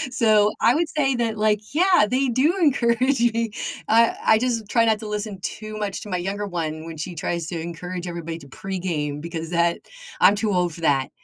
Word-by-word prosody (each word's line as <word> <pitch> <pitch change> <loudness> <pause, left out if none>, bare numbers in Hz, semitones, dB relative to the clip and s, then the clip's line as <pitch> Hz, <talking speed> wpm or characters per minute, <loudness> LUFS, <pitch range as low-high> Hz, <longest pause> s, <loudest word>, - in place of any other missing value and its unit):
So, 215 -4 +4
I 230 +4 +5
would 335 0 +1
say 270 -3 +2
that, 225 -3 -1
like, 210 +1 0
yeah, 360 - +4
they 260 +4 +1
do 260 +8 +2
encourage 255 -3 +2
me. 230 -1 -1 0.4
I 230 +1 +4
I 220 - +5
just 230 -3 -1
try 230 -1 +3
not 220 -2 +2
to 215 - -7
listen 210 -2 -4
too 215 +2 -6
much 200 -2 -3
to 210 - -9
my 180 - -1
younger 195 +3 -3
one 160 -4 -4
when 165 -1 -8
she 170 +3 -5
tries 170 +1 -3
to 170 -2 -4
encourage 175 +2 -6
everybody 170 -1 -5
to 140 - -14
pregame 160 -3 -4
because 165 0 -5
that 170 0 +1 0.4
I'm 200 - +6
too 215 0 -1
old 180 -2 +1
for - - -11
that. 140 -4 +2
205 Hz, 210 wpm, -23 LUFS, 170-230 Hz, 0.4 s, I'm